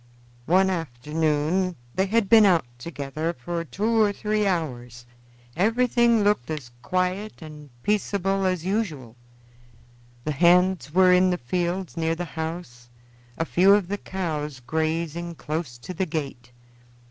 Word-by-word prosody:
One 190 +3 +4
afternoon 160 +4 -1 0.2
they 190 +1 +1
had 220 0 +1
been 220 +1 +7
out 175 -8 +4
together 155 +3 -4
for 170 +6 -4
two 215 - 0
or 210 -1 +4
three 210 0 -1
hours; 125 -9 -3 0.5
everything 235 +2 +3
looked 205 -11 +1
as 145 -6 -5
quiet 185 +8 -2
and 150 -2 -11
peaceable 195 -2 0
as 180 -2 -1
usual; 165 - -2 1.1
the 150 - -2
hands 175 +1 +3
were 185 +2 +5
in 185 +1 +4
the 180 - 0
fields 175 +6 -3
near 165 0 0
the 175 +1 -4
house, 160 -8 -6 0.5
a 165 - -1
few 190 +4 +5
of 200 -4 -1
the 205 0 -2
cows 150 -7 -4
grazing 160 +5 -2
close 150 -5 -4
to 120 +9 -8
the 185 +2 -2
gate. 140 -6 -5
170 Hz, 135 wpm, -25 LUFS, 150-190 Hz, 1.1 s, been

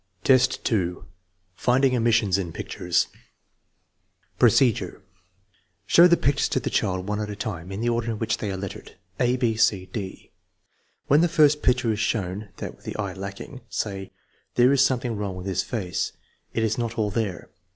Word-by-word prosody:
VI, 130 -1 +7
2. 110 -8 -1 0.5
Finding 130 +5 +2
omissions 115 -5 +2
in 85 -4 -4
pictures 90 +2 -1 1.3
Procedure. 115 -6 +3 0.8
Show 170 +9 +7
the 170 -1 +4
pictures 140 +1 +1
to - - +1
the - - -4
child 95 -2 0
one 105 0 -1
at 105 - -4
a 105 - -5
time 95 -5 -5
in 95 +3 -4
the 120 - +1
order 115 0 -1
in 110 - -2
which 115 - -1
they 105 - -3
are 95 - -4
lettered, 95 0 -8 0.2
a, 125 0 +2
6, 115 -3 +2
c, 100 -4 +1
d. 95 -4 -6 0.7
When 145 +3 +4
the 175 - +4
first 150 -2 +4
picture 125 -2 +2
is 105 - -2
shown 100 -1 -2
(that - - -6
with - - -25
the - - -5
eye 100 -3 -3
lacking), 100 +7 -8
say: 95 -2 -4 0.4
There 125 +2 +5
is 135 -1 +5
something 125 -3 0
wrong 100 -2 -3
with 90 0 -7
this 95 -2 0
face. 95 -7 -3 0.4
It 115 - -1
is 110 +1 0
not 115 -1 -3
all 105 -2 0
there. 100 -5 -3
110 Hz, 180 wpm, -25 LUFS, 95-125 Hz, 1.3 s, VI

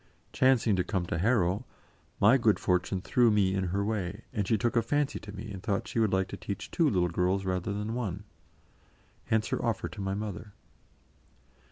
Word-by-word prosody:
Chancing 125 -5 +3
to 90 - +2
come 95 -3 -2
to 85 - -2
Harrow, 100 0 +2 0.6
my 105 +6 +6
good 115 -5 +3
fortune 90 +1 0
threw 120 +4 +3
me 100 -3 +3
in 95 -1 0
her 100 +3 -1
way, 100 -1 -3
and 105 -3 -1
she 110 - +3
took 120 +3 0
a 115 - +4
fancy 145 +3 0
to 105 - -10
me 105 +2 -7
and 95 -2 -7
thought 100 -1 -1
she - - -2
would 110 -3 +2
like 95 0 +1
to - - -6
teach 100 0 -6
two 165 -3 +3
little 90 -6 +2
girls 90 +3 0
rather 90 +1 -1
than 105 +2 -3
one. 100 -6 -3 1.0
Hence 110 -1 +1
her - - -2
offer 115 -2 -1
to 105 - -8
my 95 0 -2
mother. 105 0 -6
100 Hz, 200 wpm, -29 LUFS, 95-110 Hz, 1.0 s, my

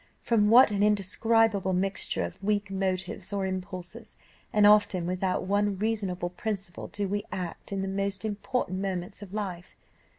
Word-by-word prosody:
From 210 -3 +2
what 240 0 +8
an 200 -1 0
indescribable 210 0 +2
mixture 195 +2 0
of - - -7
weak 205 -1 0
motives 190 0 -2
or 200 -1 -1
impulses, 185 -1 -6 0.3
and 210 -1 +4
often 205 -4 +5
without 185 +1 -1
one 200 +1 +1
reasonable 195 -4 -1
principle, 195 -2 -5
do 205 -1 -3
we 205 +2 -2
act 185 0 -6
in 195 -1 -2
the - - -2
most 195 +1 -2
important 205 -2 -2
moments 190 0 -4
of 200 -3 -9
life. 190 -4 -5
195 Hz, 155 wpm, -28 LUFS, 185-210 Hz, 0.3 s, what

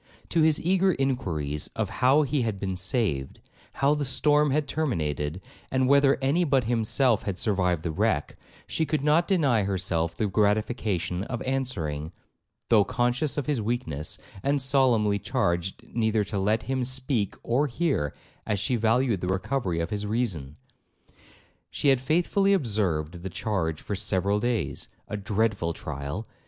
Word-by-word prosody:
To 165 - +2
his 155 -1 +4
eager 190 +2 +2
inquiries 85 - -2
of - - -1
how 135 +4 +5
he 145 -1 0
had 110 -4 -2
been 95 -1 -2
saved, 90 - -1 0.3
how 140 +2 +2
the 150 -1 -1
storm 150 +2 +3
had 145 +1 0
terminated, 80 - -2 0.3
and 130 -1 +1
whether 140 0 +5
any 150 +7 +2
but 135 -5 +2
himself 115 +1 +2
had 100 -3 -4
survived 90 -6 0
the 85 - -2
wreck, 100 -3 0 0.3
she 160 - -1
could 150 -2 -1
not 155 +4 +3
deny 145 - +3
herself 90 -4 -1
the 110 - 0
gratification 100 -3 0
of 120 -3 -4
answering, 90 - -2 0.6
though 110 -3 +6
conscious 125 +8 0
of 145 - -1
his 145 -6 0
weakness, 105 - -3 0.2
and 140 +6 +1
solemnly 125 -7 +3
charged 95 -8 -1
neither 110 -2 +1
to 100 0 -3
let 105 +3 +1
him 130 -1 -1
speak 130 -5 -1
or 130 +6 +1
hear, 135 - 0 0.3
as 105 - -1
she 105 +6 0
valued 115 -2 +2
the 90 - -2
recovery 95 -1 -1
of 85 +4 -3
his 105 0 -2
reason. 95 - -2 1.1
She 145 - +1
had 135 -2 +3
faithfully 175 +7 +2
observed 90 - 0
the 95 - -5
charge 90 -5 -2
for - - -4
several 100 +2 +1
days,—a 115 -2 -3
dreadful 100 -4 0
trial! 70 +7 -5
110 Hz, 150 wpm, -26 LUFS, 95-135 Hz, 1.1 s, though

